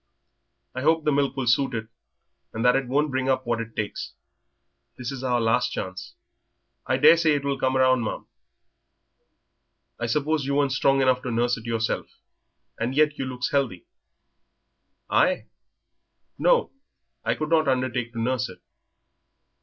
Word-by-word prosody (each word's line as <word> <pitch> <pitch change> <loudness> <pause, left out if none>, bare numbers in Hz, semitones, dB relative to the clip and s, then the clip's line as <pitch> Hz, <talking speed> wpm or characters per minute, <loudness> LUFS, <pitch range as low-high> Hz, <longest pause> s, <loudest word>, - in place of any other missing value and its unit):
"I 130 - -4
hope 160 +3 +2
the 150 - +2
milk 140 -1 0
will 130 - -1
suit 125 +1 +2
it, 110 -1 -4 0.7
and 115 +2 -2
that 125 - +5
it 135 -1 0
won't 145 +3 +1
bring 130 0 -1
up 130 -1 +1
what 120 -1 -1
it 115 -1 -9
takes. 105 -2 -4 0.8
This 125 +1 -5
is 135 -1 -7
our 125 -2 +1
last 120 +2 +2
chance." 95 0 -6 0.7
"I - - +2
daresay 165 -2 +5
it 140 -1 -3
will 140 -1 -1
come 130 0 +1
round, 130 -2 +3
ma'am. 110 - -4 1.7
I 120 - -2
suppose 150 +4 0
you 140 +1 -1
weren't 140 -1 +2
strong 135 0 +2
enough 130 -1 +2
to 125 - -4
nurse 120 +1 +1
it 115 -2 -10
yourself, 115 -1 -1 0.7
and 120 +4 -2
yet 150 0 +2
you 135 - -1
looks 125 -1 -3
healthy." 140 - -1 1.2
"I? - - +2 0.9
No, - - +3 0.5
I - - 0
could 155 0 -4
not 160 -2 +3
undertake 130 -2 0
to 115 - -5
nurse 125 +2 -1
it." - - -11
130 Hz, 160 wpm, -25 LUFS, 120-140 Hz, 1.7 s, that